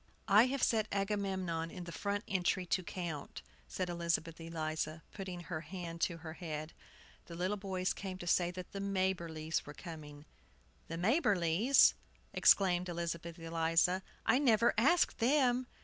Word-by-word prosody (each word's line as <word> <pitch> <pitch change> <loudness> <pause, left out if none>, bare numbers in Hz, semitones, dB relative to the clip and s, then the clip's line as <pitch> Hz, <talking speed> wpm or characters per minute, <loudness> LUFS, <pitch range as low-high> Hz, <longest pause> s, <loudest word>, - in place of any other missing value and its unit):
"I 210 +5 +6
have 270 0 -2
set 220 -2 +2
Agamemnon 190 -5 -1
in 180 - -8
the 170 - -8
front 200 +4 -2
entry 185 -1 0
to 185 - 0
count," 170 - -6 0.2
said 185 - -3
Elizabeth 170 -1 -2
Eliza, 160 -1 -3
putting 185 -3 -6
her 170 -2 -5
hand 170 -2 -7
to 170 - 0
her 160 -1 -8
head. 155 -2 -6 0.5
The 170 - -8
little 185 +4 -1
boys 190 -2 -2
came 190 -2 -6
to 175 - -8
say 175 0 +2
that 180 0 -8
the 200 - -5
Maberlys 175 -5 -1
were 145 - -10
coming. 150 -4 -9 0.6
"The 165 - -5
Maberlys!" 205 - +4 0.4
exclaimed 180 -2 +4
Elizabeth 170 0 -4
Eliza. 165 +2 +1 0.2
"I 255 - +4
never 235 -4 +4
asked 295 +10 +3
them." 255 0 +3
180 Hz, 150 wpm, -34 LUFS, 165-200 Hz, 0.6 s, I